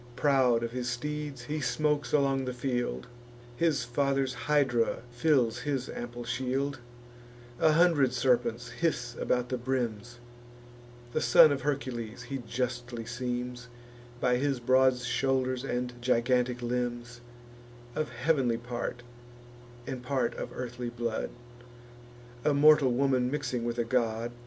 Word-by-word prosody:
Proud 130 Hz, -5 st, +3 dB
of 115 Hz, -, -3 dB
his 125 Hz, 0 st, -3 dB
steeds, 145 Hz, +1 st, -4 dB
he 150 Hz, +4 st, -3 dB
smokes 150 Hz, +3 st, 0 dB
along 135 Hz, -2 st, +2 dB
the 125 Hz, -1 st, -4 dB
field; 125 Hz, -1 st, -2 dB, 0.5 s
His 160 Hz, -1 st, +1 dB
father's 135 Hz, +1 st, 0 dB
hydra 130 Hz, -5 st, +1 dB
fills 120 Hz, -2 st, +2 dB
his 135 Hz, -3 st, -2 dB
ample 120 Hz, 0 st, -6 dB
shield: 130 Hz, +3 st, -2 dB, 0.8 s
A 155 Hz, -, +5 dB
hundred 155 Hz, -6 st, +4 dB
serpents 120 Hz, -2 st, +1 dB
hiss 120 Hz, -4 st, -1 dB
about 125 Hz, 0 st, 0 dB
the 125 Hz, -, -2 dB
brims; 120 Hz, -2 st, -3 dB, 1.0 s
The 155 Hz, -, 0 dB
son 165 Hz, -2 st, +7 dB
of 140 Hz, -1 st, -1 dB
Hercules 130 Hz, -5 st, -3 dB
he 135 Hz, -1 st, -5 dB
justly 120 Hz, -1 st, -4 dB
seems 125 Hz, +1 st, -4 dB, 0.5 s
By 125 Hz, 0 st, +2 dB
his 135 Hz, 0 st, 0 dB
broad 130 Hz, +1 st, +4 dB
shoulders 130 Hz, +1 st, 0 dB
and 125 Hz, -2 st, -2 dB
gigantic 125 Hz, 0 st, +1 dB
limbs; 120 Hz, 0 st, -3 dB, 0.7 s
Of 155 Hz, -4 st, -2 dB
heav'nly 125 Hz, -1 st, +1 dB
part, 120 Hz, 0 st, -5 dB, 0.8 s
and 130 Hz, -2 st, -5 dB
part 125 Hz, -2 st, 0 dB
of -, -, -5 dB
earthly 120 Hz, -1 st, -5 dB
blood, 120 Hz, -1 st, -3 dB, 1.1 s
A 150 Hz, -, +2 dB
mortal 150 Hz, -2 st, +6 dB
woman 130 Hz, -1 st, +2 dB
mixing 130 Hz, -4 st, -2 dB
with 120 Hz, 0 st, -2 dB
a 120 Hz, -, +2 dB
god. 115 Hz, -1 st, 0 dB
125 Hz, 130 wpm, -29 LUFS, 120-135 Hz, 1.1 s, son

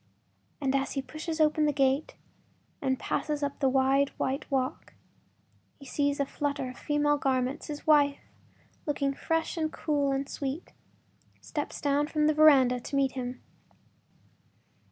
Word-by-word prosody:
As 275 Hz, 0 st, 0 dB
he 275 Hz, -, -1 dB
pushes 310 Hz, +4 st, -5 dB
open 305 Hz, 0 st, +3 dB
the -, -, +3 dB
gate 275 Hz, +1 st, +1 dB, 0.7 s
and 260 Hz, -1 st, +1 dB
passes 300 Hz, +2 st, -2 dB
up 280 Hz, 0 st, -3 dB
the 270 Hz, -2 st, +3 dB
wide 270 Hz, +1 st, +3 dB
white 270 Hz, +2 st, -2 dB
walk, 260 Hz, -2 st, -2 dB, 0.8 s
he 275 Hz, -, -14 dB
sees 285 Hz, +1 st, 0 dB
a 280 Hz, -, +2 dB
flutter 280 Hz, -2 st, -3 dB
of 255 Hz, -, -14 dB
female 295 Hz, 0 st, +1 dB
garments; 260 Hz, 0 st, -1 dB
his 295 Hz, -1 st, -6 dB
wife, 290 Hz, -2 st, +3 dB, 0.6 s
looking 280 Hz, -2 st, 0 dB
fresh 325 Hz, +4 st, -1 dB
and 315 Hz, -1 st, -1 dB
cool 290 Hz, -4 st, 0 dB
and 275 Hz, 0 st, -1 dB
sweet, 280 Hz, +4 st, -5 dB, 0.7 s
steps -, -, -5 dB
down 290 Hz, +1 st, +1 dB
from 305 Hz, -1 st, +1 dB
the 310 Hz, -, +4 dB
veranda 275 Hz, -5 st, +6 dB
to 260 Hz, -, -6 dB
meet 275 Hz, -1 st, +2 dB
him. 250 Hz, -1 st, -6 dB
280 Hz, 145 wpm, -29 LUFS, 270-300 Hz, 0.8 s, veranda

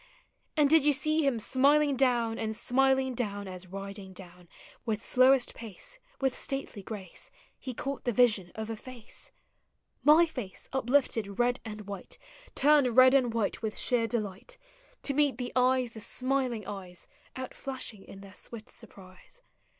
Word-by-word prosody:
And 295 Hz, -2 st, +5 dB
did 315 Hz, 0 st, +5 dB
you 295 Hz, 0 st, +4 dB
see 310 Hz, +3 st, +2 dB
him 270 Hz, -5 st, +1 dB
smiling 280 Hz, +4 st, +3 dB
down, 240 Hz, -3 st, +2 dB
And 220 Hz, -1 st, -2 dB
smiling 265 Hz, +1 st, +2 dB
down, 205 Hz, -4 st, -3 dB
as 185 Hz, 0 st, -8 dB
riding 195 Hz, 0 st, -8 dB
down 180 Hz, -2 st, -10 dB, 0.3 s
With 220 Hz, -3 st, -1 dB
slowest 255 Hz, +2 st, +4 dB
pace, 235 Hz, -, -9 dB, 0.2 s
with 265 Hz, -2 st, +1 dB
stately 270 Hz, -6 st, -4 dB
grace, 195 Hz, -, -8 dB, 0.3 s
tie 255 Hz, -, -4 dB
caught 275 Hz, +3 st, -4 dB
the 245 Hz, -, +2 dB
yision 215 Hz, -6 st, +3 dB
of 220 Hz, 0 st, -4 dB
a -, -, -3 dB
face, 240 Hz, +1 st, -9 dB, 0.4 s
— -, -, -48 dB
My 340 Hz, -, +6 dB
face 250 Hz, -, -7 dB
uplifted 245 Hz, -6 st, +1 dB
red 245 Hz, 0 st, +2 dB
and 215 Hz, -2 st, -7 dB
white, 200 Hz, -2 st, -7 dB, 0.4 s
Turned 275 Hz, -4 st, +4 dB
red 255 Hz, 0 st, +8 dB
and 255 Hz, -4 st, +4 dB
white 225 Hz, -3 st, -1 dB
with 220 Hz, -2 st, -3 dB
sheer 240 Hz, -3 st, +1 dB
delight, 215 Hz, -, -4 dB, 0.5 s
To 280 Hz, -, +2 dB
meet 285 Hz, -3 st, +2 dB
the 245 Hz, -1 st, -5 dB
eyes, 255 Hz, -1 st, +3 dB
the 225 Hz, -, -9 dB
smiling 255 Hz, -1 st, -1 dB
eyes, 185 Hz, -3 st, -8 dB, 0.3 s
Outllashing 260 Hz, -5 st, -6 dB
in 195 Hz, -, -12 dB
their 195 Hz, -1 st, -12 dB
swift 220 Hz, +1 st, -8 dB
surprise? 200 Hz, -, -12 dB
240 Hz, 160 wpm, -30 LUFS, 205-265 Hz, 0.5 s, red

